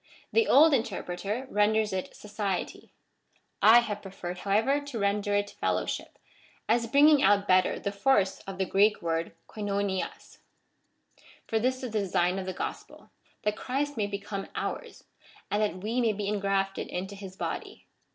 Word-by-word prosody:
The 455 0 +3
old 305 +3 +7
interpreter 220 -1 -2
renders 210 0 +2
it 185 -1 -4
society. 205 -2 -4 0.7
I 230 +3 +8
have 210 -3 -4
preferred, 180 -2 -7
however, 220 +9 +2
to 285 -4 -7
render 205 0 0
it 205 0 0
fel - - +2
lowship, - - -4 0.5
as 230 +1 +2
bringing 290 +3 +6
out 200 +1 +4
better 185 0 +3
the 200 - -3
force 200 -2 +2
of 195 -1 -6
the 190 - 0
Greek 205 +2 +3
word 165 0 -1
KOLvwvia'^} 200 -2 -3 1.1
For 225 - 0
this 255 +3 +1
is 250 - -4
the 215 - 0
design 185 -1 +1
of 190 - -6
the - - -1
gospel, 180 - -7 0.3
that 210 0 0
Christ 285 +5 -2
may 210 -2 0
become 200 -1 -5
ours, - - -5 0.5
and 205 - +1
that 185 -3 -1
we 230 +4 0
may 225 -2 +2
be 205 0 -4
ingrafted 195 -1 -1
into 190 +3 -5
his 195 -2 -9
body. - - -5
205 Hz, 160 wpm, -28 LUFS, 195-225 Hz, 1.1 s, I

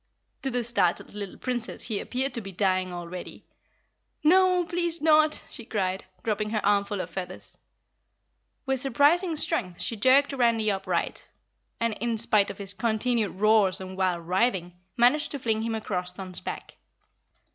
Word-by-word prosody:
To 270 - -2
the 245 -1 -1
startled 220 -8 0
little 200 -2 -6
Princess 245 -3 -3
he 215 -4 -1
appeared 260 +1 -2
to 235 - -2
be 195 -2 -8
dying 185 -1 0
already. 175 0 -8 0.8
"No, 365 +3 +5
no! - - -9
Please 340 -1 -1
not!" 310 0 +4
she 235 - -7
cried, 190 -4 -2 0.2
dropping 215 -1 -1
her 215 -2 -1
armful 200 -1 +1
of 175 -1 -7
feathers. 185 0 -7 1.1
With 265 -1 0
surprising 290 +7 +3
strength 190 - 0
she 230 - -2
jerked 265 +6 +4
Randy 230 -4 +2
upright 195 -1 -2 0.5
and, 230 -1 0
in 235 -1 0
spite 210 -2 +3
of 200 - -7
his 200 -1 -1
continued 220 +1 0
roars 215 -3 +4
and 190 0 -7
wild 180 -3 0
writhing, 185 -2 +1 0.2
managed 250 +6 +4
to - - -2
fling 220 -3 0
him 225 0 -2
across 180 -4 -3
Thun's 185 -1 -6
back. - - -7
220 Hz, 155 wpm, -27 LUFS, 190-255 Hz, 1.1 s, No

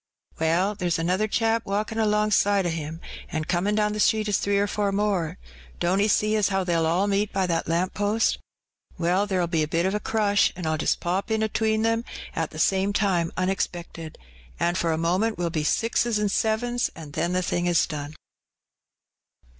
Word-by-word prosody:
Well, 170 +6 +2
there's 180 -4 -1
another 180 +6 0
chap 225 +1 +1
walkin* 210 +3 -2
alongside 210 -2 +2
o* - - +1
him, 165 0 -5 0.3
VD^ 155 0 -3
comin* 190 +4 +1
down 210 -1 +1
the 210 - -4
street 215 0 +2
is 205 - +1
three 200 0 +1
or 200 - +2
four 205 -1 -1
more; 195 -4 0 0.4
don't 180 +3 +1
'e 205 - +3
jee 215 +1 +2
as 210 -3 +2
how 195 -1 0
they'll 165 -2 +1
all 175 +5 +2
meet 205 +1 0
by 195 -1 0
that 170 -2 -1
lamp 175 +3 0
post? 205 +2 +1 0.6
Well, 180 +4 +1
her'll 185 -3 +1
be 165 -2 0
a 155 - 0
bit 165 +3 0
o' 210 - 0
crush, 205 -2 +2
an' 180 - -7
Pll 155 -1 -1
just - - 0
pop 185 +5 -1
in 220 0 +1
atween 220 0 0
'em 225 0 +1 0.3
it 165 -2 -1
the - - -11
same 190 +4 +2
time 185 -5 +1
onexpected, 175 -3 -3 0.4
an' 175 - +1
for 170 -2 0
a 160 - 0
moment 185 +7 0
we'll 170 -1 -1
be 160 -2 -1
jixes 230 +6 +1
an' 210 -1 +1
sevens, 240 +4 0
an' 155 -3 -10
then 170 +4 -1
the 185 0 +1
thing 175 0 -1
is 175 -1 +3
done." 150 -1 -6
195 Hz, 195 wpm, -25 LUFS, 170-210 Hz, 0.6 s, e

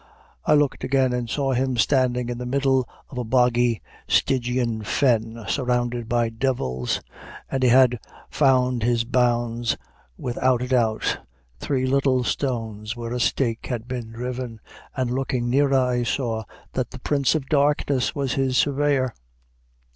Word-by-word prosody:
I 150 - +5
looked 145 -2 +1
again, 130 -1 +2
and 120 -1 -2
saw 135 +1 0
him 130 0 0
standing 125 0 +2
in 120 0 -4
the 125 - -4
middle 135 -1 +1 0.2
of 125 - -5
a - - -1
boggy, 120 -1 +2 0.2
stygian 120 -3 +1
fen, 115 -1 0
surrounded 120 -2 -1
by 120 -1 +2
devils, 115 - -1 0.5
and 135 - -1
he 130 - +4
had 125 -1 +5 0.3
found 130 -3 +3
his 115 0 +2
bounds 120 -1 +1 0.4
without 125 0 0
a - - -3
doubt, 115 -4 +1 0.4
three 130 -2 -1
little 130 -1 +2
stones, 115 -5 -2
where 120 0 -5
a 125 - -2
stake 120 -1 0
had 120 -2 -4
been 120 -3 -5
driven, 125 0 -5 0.4
and 130 -2 0
looking 125 -2 -1
nearer, 140 +1 +3
I 125 -1 +1
saw 115 -2 -1 0.3
that - - -1
the - - -10
Prince 140 -1 +1
of 140 -4 -2
Darkness 145 -3 +1
was 135 -3 -1
his 130 -1 +1
surveyor. 140 -3 +2
125 Hz, 145 wpm, -23 LUFS, 120-130 Hz, 0.5 s, I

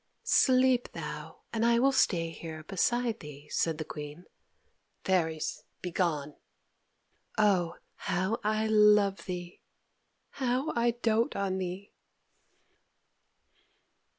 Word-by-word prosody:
"Sleep 255 -1 +4
thou, - - -7
and 225 0 0
I 235 0 +4
will 270 +3 +4
stay 170 -10 +2
here 160 -1 -8
beside 230 +6 0
thee," 150 -1 -11
said 165 -2 0
the 155 - -4
Queen. 150 +3 -8 0.8
"Fairies, 160 -4 0 0.2
begone! 165 -5 -1 1.0
Oh, 185 -5 +3 0.2
how 190 +4 -1
I 215 +1 +1
love 210 -2 +4
thee! 175 -2 -6 0.7
how 260 +2 -1
I 235 0 +3
doat 230 -1 +1
on 190 -1 -1
thee!" 185 +2 -5
195 Hz, 100 wpm, -30 LUFS, 170-230 Hz, 1.0 s, Sleep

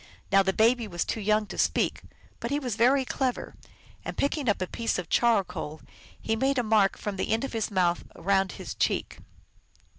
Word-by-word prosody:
Now 195 0 +6
the 190 0 +1
baby 230 +3 +3
was 175 -3 -2
too 220 - -3
young 215 +1 +2
to - - -8
speak, - - +1 0.4
but 235 - -4
he 285 - 0
was 250 -7 -3
very 260 +4 +3
clever, 255 -1 -2 0.5
and, - - -6
picking 280 -3 0
up 205 - +1
a 185 - -1
piece 230 +5 -2
of 180 - -5
charcoal, 195 -9 +1 0.4
he 225 - -1
made 270 +4 +1
a 245 - +2
mark 215 -3 +3
from 205 -2 -4
the 190 - -2
end 225 +3 +1
of 275 - -4
his 225 -2 -1
mouth 180 -4 +1
around 195 +1 +1
his - - -7
cheek. - - -1
220 Hz, 200 wpm, -27 LUFS, 195-245 Hz, 0.5 s, Now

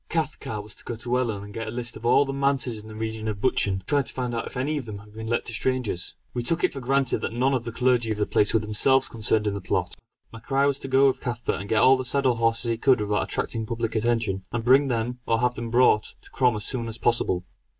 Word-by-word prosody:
Cathcart 150 -9 -3
was 105 0 -9
to - - -14
go 120 - -5
to 120 +2 -1
Ellon 110 -5 -2
and 105 0 -10
get 115 +1 -5
a - - -3
list 120 +1 -5
of 115 +2 -4
all 140 - +5
the 135 - -4
manses 135 -4 0
in 105 - -12
the 110 - -10
region 110 0 -4
of 105 -2 -3
Buchan, 105 -4 +2
and 95 0 -5
try 145 +5 +2
to 125 - -3
find 125 -2 -2
out 115 - -3
if - - -8
any 145 +5 -1
of 130 - -7
them 105 -2 -6
had 105 +1 -15
been 110 +1 -7
let 120 +1 0
to 115 - -6
strangers. 120 -6 -1 0.2
We 120 - -2
took 165 +8 0
it 185 - +2
for 135 - -5
granted 135 +1 +1
that - - -4
none 130 +3 +1
of 125 -3 -1
the 115 - -4
clergy 125 -1 +1
of 110 - -2
the 105 - +1
place 105 - +3
were 110 - +3
themselves 130 +5 +3
concerned 110 -1 +1
in 105 - 0
the 100 - -4
plot. 90 0 -1 0.4
MacRae 135 +5 0
was 140 -1 +1
to - - -7
go 135 +1 +4
with 130 - 0
Cathcart 120 -5 -3
and 100 - -8
to - - +1
get 105 - +4
all 130 +1 +7
the 130 - -3
saddle 130 -1 +1
horses 115 +1 +1
he 115 - -1
could 130 0 +3
without 105 0 0
attracting 110 -2 -3
public 115 0 -2
attention, 110 -4 0
and 120 -1 -2
bring 135 +4 +5
them, 120 0 -2
or 115 0 +2
have 125 0 +1
them 120 -1 -5
brought, 120 -3 +3
to - - -17
Crom 125 -3 +2
as 105 -1 -1
soon 120 -3 -1
as 115 0 -4
possible. 115 -6 +1
120 Hz, 285 wpm, -25 LUFS, 110-130 Hz, 0.4 s, all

